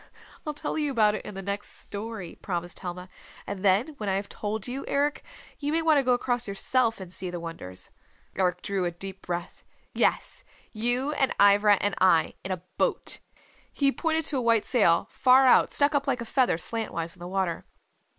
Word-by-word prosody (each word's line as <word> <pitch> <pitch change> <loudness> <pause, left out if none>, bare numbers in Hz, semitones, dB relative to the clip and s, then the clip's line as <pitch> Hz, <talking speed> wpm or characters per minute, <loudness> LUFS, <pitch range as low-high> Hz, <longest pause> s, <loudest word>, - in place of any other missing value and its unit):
"I'll 300 - -2
tell 300 - -2
you 295 -1 0
about 215 -5 +3
it 215 - -4
in 210 - -8
the 195 - -6
next 200 +1 -4
story," 205 -4 -7
promised 175 -2 -3
Helma. 180 0 -6 0.4
"And 200 -1 -6
then 200 +8 +3
when 210 -2 -2
I 190 - +1
have 200 +1 -3
told 215 +1 -4
you, 260 +3 -4
Eric, 290 +1 0 0.4
you 290 0 -2
may 325 +1 +1
want 315 -3 +5
to - - +1
go 250 -1 +3
across 245 -1 0
yourself 225 +3 +1
and 185 -2 -4
see 185 -1 +1
the 175 0 -5
wonders." 165 - -7 0.4
Eric 180 -1 0
drew 195 -3 -1
a - - +1
deep 190 +3 -8
breath. 175 0 -5 0.3
"Yes, - - 0 0.3
you 245 +5 0
and 270 -3 0
Ivra 205 +1 +6
and 205 0 0
I. 185 -4 +4
In 190 - -4
a 180 -2 -4 0.2
boat." - - -1 0.5
He 280 -1 +2
pointed 320 +1 -1
to 280 - +1
a - - 0
white 230 -2 +3
sail 200 -10 +3
far 260 +1 +5
out 255 - +6
stuck 285 +1 +3
up 285 0 0
like 260 -2 +1
a - - -4
feather 250 - +2
slantwise 170 -5 -3
in - - -22
the 175 - -7
water. 185 -3 -1
210 Hz, 200 wpm, -27 LUFS, 185-255 Hz, 0.5 s, Ivra